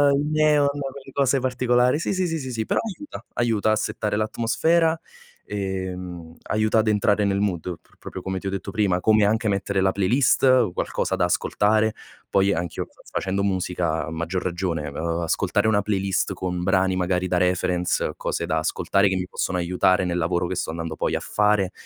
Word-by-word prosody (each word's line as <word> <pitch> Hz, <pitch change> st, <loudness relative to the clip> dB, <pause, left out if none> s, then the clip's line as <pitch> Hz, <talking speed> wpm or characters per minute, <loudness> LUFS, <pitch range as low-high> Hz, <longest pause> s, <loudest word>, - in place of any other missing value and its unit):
i 145 Hz, +2 st, 0 dB
neon, 155 Hz, -2 st, +4 dB
quelle 140 Hz, -1 st, -5 dB
cose 140 Hz, 0 st, +2 dB
particolari, 125 Hz, +1 st, +2 dB
sì, 165 Hz, -, -1 dB
sì, 185 Hz, -1 st, 0 dB
sì, 165 Hz, -1 st, -2 dB
sì, 130 Hz, -3 st, -5 dB
sì, 110 Hz, -2 st, -2 dB
però -, -, +1 dB
aiuta. 225 Hz, +7 st, -8 dB
Aiuta 110 Hz, -3 st, +1 dB
a -, -, +3 dB
settare 105 Hz, -1 st, -2 dB
l'atmosfera, 125 Hz, +10 st, +1 dB, 0.5 s
ehm, 90 Hz, -4 st, -5 dB
aiuta 110 Hz, +1 st, +1 dB
ad 110 Hz, -, +1 dB
entrare 105 Hz, 0 st, +2 dB
nel 100 Hz, 0 st, +1 dB
mood 95 Hz, -5 st, 0 dB, 0.2 s
pro -, -, -28 dB
proprio 95 Hz, -, -8 dB
come 95 Hz, +1 st, -3 dB
ti 95 Hz, -, -8 dB
ho 95 Hz, -, -1 dB
detto 95 Hz, -1 st, -4 dB
prima, 100 Hz, -5 st, +1 dB
come 110 Hz, +2 st, +4 dB
anche 110 Hz, +2 st, +1 dB
mettere 100 Hz, -1 st, 0 dB
la 95 Hz, 0 st, +3 dB
playlist, 125 Hz, +3 st, +3 dB
qualcosa -, -, -2 dB
da -, -, +2 dB
ascoltare. 110 Hz, +1 st, +1 dB, 0.4 s
Poi 100 Hz, +1 st, +3 dB
anch'io 85 Hz, 0 st, -3 dB
fa -, -, -23 dB
facendo 95 Hz, +1 st, -1 dB
musica 90 Hz, -4 st, -1 dB
a 80 Hz, -, -7 dB
maggior 85 Hz, +3 st, -3 dB
ragione, 85 Hz, -4 st, -2 dB
uhm, 85 Hz, +4 st, -2 dB
ascoltare 100 Hz, +5 st, +1 dB
una 105 Hz, -2 st, +3 dB
playlist 100 Hz, -2 st, 0 dB
con 90 Hz, -1 st, -3 dB
brani 95 Hz, 0 st, +2 dB
magari 90 Hz, 0 st, 0 dB
da 90 Hz, 0 st, +1 dB
reference, 90 Hz, 0 st, 0 dB
cose -, -, -2 dB
da -, -, 0 dB
ascoltare 100 Hz, +1 st, +1 dB
che 95 Hz, -, 0 dB
mi 90 Hz, 0 st, -2 dB
possono 90 Hz, 0 st, -2 dB
aiutare 90 Hz, +1 st, +2 dB
nel 90 Hz, 0 st, -1 dB
lavoro 85 Hz, +1 st, 0 dB
che 95 Hz, -, -3 dB
sto -, -, -2 dB
andando 80 Hz, -1 st, -4 dB
poi -, -, -1 dB
a -, -, 0 dB
fare, 105 Hz, -3 st, +1 dB
100 Hz, 190 wpm, -23 LUFS, 90-115 Hz, 0.5 s, neon